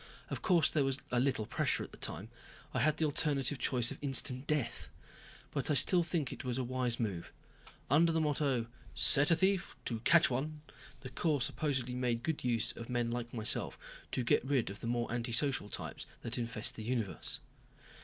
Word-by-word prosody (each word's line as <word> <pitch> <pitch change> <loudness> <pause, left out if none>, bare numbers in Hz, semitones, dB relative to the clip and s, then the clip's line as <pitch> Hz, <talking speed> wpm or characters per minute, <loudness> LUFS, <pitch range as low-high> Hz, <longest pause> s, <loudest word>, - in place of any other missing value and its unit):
Of - - -3
course 170 -5 +4
there 150 - +1
was 135 -1 0
a 125 - +2
little 125 -4 +1
pressure - - 0
at - - -10
the - - -12
time. - - -4 0.4
I - - 0
had 150 +5 +2
the 160 - +1
alternative 145 -2 +1
choice 120 -2 +1
of - - -7
instant 135 -1 +2
death. 145 -6 -1 0.6
But - - -2
I 150 - +3
still 175 +5 +7
think 165 -5 -1
it - - -8
was 125 -1 -2
a 130 - 0
wise 125 -1 -1
move. 100 -7 -3 0.6
Under 165 +5 +4
the 165 - +1
motto 145 -5 +1 0.3
"Set 145 +1 +3
a 165 - +6
thief 190 +2 +1
to 115 -2 -2
catch 170 +8 +5
one," 150 +4 -3 0.4
the 130 - -8
Corps 155 -4 +1
supposedly 135 -2 -1
made 125 -2 -1
good 160 -2 -2
use 120 -3 +1
of 115 +1 -9
men 120 -1 0
like 120 0 -4
myself 110 -2 -1 0.4
to 125 - 0
get 120 - +3
rid 130 -6 0
of 100 - -9
the - - -5
more 120 0 -1
antisocial 120 -1 0
types - - -6 0.2
that 120 +1 -2
infest 115 -2 -2
the 110 - -6
universe. 115 -4 -2
130 Hz, 195 wpm, -33 LUFS, 120-150 Hz, 0.6 s, still